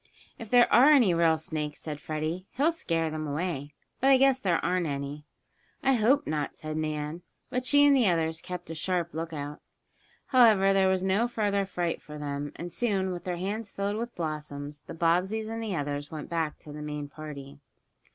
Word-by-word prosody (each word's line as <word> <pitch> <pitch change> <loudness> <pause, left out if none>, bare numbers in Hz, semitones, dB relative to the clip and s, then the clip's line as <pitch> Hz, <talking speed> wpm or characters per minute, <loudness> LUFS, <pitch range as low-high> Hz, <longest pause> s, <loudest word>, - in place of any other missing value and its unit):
"If 225 - -8
there 245 0 +6
are 265 +5 +8
any 250 - +6
real 165 -1 +3
snakes," 155 -1 -4
said 150 -2 -6
Freddie, 155 +5 -3
"he'll 295 +6 +3
scare 165 - -1
them 155 0 -4
away. 145 -2 -3 0.2
But 270 - +3
I 270 - +7
guess 270 0 +4
there 180 -8 +2
aren't 180 -1 +1
any." 140 +1 -4 0.6
"I 270 - +4
hope 255 +5 +3
not," 150 -2 -2
said 155 0 -5
Nan, 155 +1 -3 0.3
but 255 0 -2
she 285 +1 +6
and 285 -1 +6
the 250 -5 +4
others 165 -1 0
kept 180 -2 -7
a - - -3
sharp 170 +1 -1
lookout. 155 -2 -5 0.7
However, 215 -7 +5
there 190 -1 +4
was 190 0 +1
no 195 +5 +2
further 205 -4 0
fright 175 -3 -2
for 150 0 -10
them, 145 -1 -4
and 175 0 -7
soon, 195 -6 0
with 175 -1 -6
their 180 -1 -2
hands 205 +4 -3
filled 200 +1 -2
with 235 +1 -5
blossoms 150 -3 -5
the - - -9
Bobbseys 180 +7 +1
and 225 +1 -4
the 215 -4 -2
others 145 -1 -3
went 155 -2 -7
back 160 -2 -1
to 150 - -11
the 150 - -7
main 150 -1 -4
party. 145 -2 -9
170 Hz, 195 wpm, -28 LUFS, 150-210 Hz, 0.7 s, are